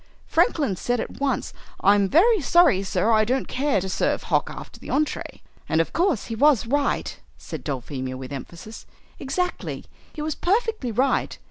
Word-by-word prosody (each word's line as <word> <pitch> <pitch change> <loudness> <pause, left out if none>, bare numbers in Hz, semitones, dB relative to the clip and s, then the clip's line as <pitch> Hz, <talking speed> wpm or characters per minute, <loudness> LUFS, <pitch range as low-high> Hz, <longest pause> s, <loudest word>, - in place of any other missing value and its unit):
Franklin 285 - +2
said 245 +6 -1
at - - -6
once, 280 -1 -1 0.3
'I'm 200 -1 +4
very 415 - +4
sorry, 300 - +4
sir, 200 +3 0
I 215 -1 +5
don't 255 +4 -1
care 275 -4 0
to 190 - -4
serve 185 - 0
hock - - +1
after - - -10
the - - -11
entree!'" 300 +1 -2 0.3
"And 160 - +2
of 165 - 0
course 345 - +1
he 230 - -5
was 280 -1 +4
right," 280 +4 -1 0.2
said - - -8
Dulphemia 130 -1 -4
with 130 +1 -7
emphasis. 170 +10 -9 0.3
"Exactly; 360 +7 -3 0.3
he 300 - -6
was 310 0 -1
perfectly 420 - 0
right. 260 +5 0
250 Hz, 165 wpm, -24 LUFS, 195-300 Hz, 0.3 s, I